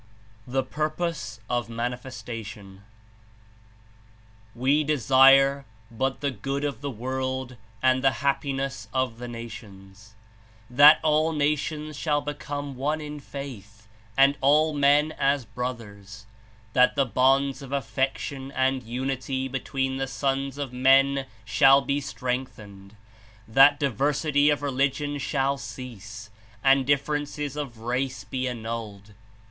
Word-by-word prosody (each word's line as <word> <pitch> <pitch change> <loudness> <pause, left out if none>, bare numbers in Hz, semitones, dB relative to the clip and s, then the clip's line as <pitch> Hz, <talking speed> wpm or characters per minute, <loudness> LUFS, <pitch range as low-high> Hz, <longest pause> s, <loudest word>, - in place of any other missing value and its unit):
THE 135 +1 0
PURPOSE 155 -8 -3
OF 120 -1 -2
MANTFESTATIOX 115 -4 -6 1.8
"We 135 +5 +2
desire 135 -1 +5 0.3
but 130 +3 -2
the 140 -1 0
good 135 +5 -4
of 145 -2 -3
the 145 - -3
world 130 +1 -4 0.3
and 130 0 +3
the 135 - +6 0.2
hap 140 -1 +2
piness 135 -1 -4
of 130 -3 -1
the 125 - -6
nations; 110 -3 -11 0.6
that 145 +5 +8
all 155 +1 +2
nations 150 +1 -1
shall 150 -2 +1
become 145 -1 -5
one 150 +4 -1
in 150 -1 -7
faith 110 -7 -9 0.3
and 140 +1 +5
all 150 +3 +4
men 145 +2 +3
as 140 -2 +1
brothers; 110 -3 -7 0.5
that 125 0 +4
the 140 -1 +2
bonds 135 +4 +2
of 135 -1 -10
affection 135 +1 -2
and 130 0 +1
unity 130 +2 -3
between 135 0 -2
the 135 0 -2
sons 135 0 -2
of 140 -3 -5
men 135 +1 +3 0.2
shall 135 +5 +6
be 140 +1 -1
strengthened; 110 -7 -6 0.5
that 135 +5 +6
diversity 145 +2 +1
of 145 -1 0
religion 140 +1 -1
shall 140 0 0
cease 110 -4 -9 0.3
and 135 -1 +4
differences 145 0 -1
of 140 -6 -5
rice 125 +4 -3
be 130 -1 -3
annulled. 110 -4 -6
135 Hz, 120 wpm, -25 LUFS, 120-140 Hz, 1.8 s, that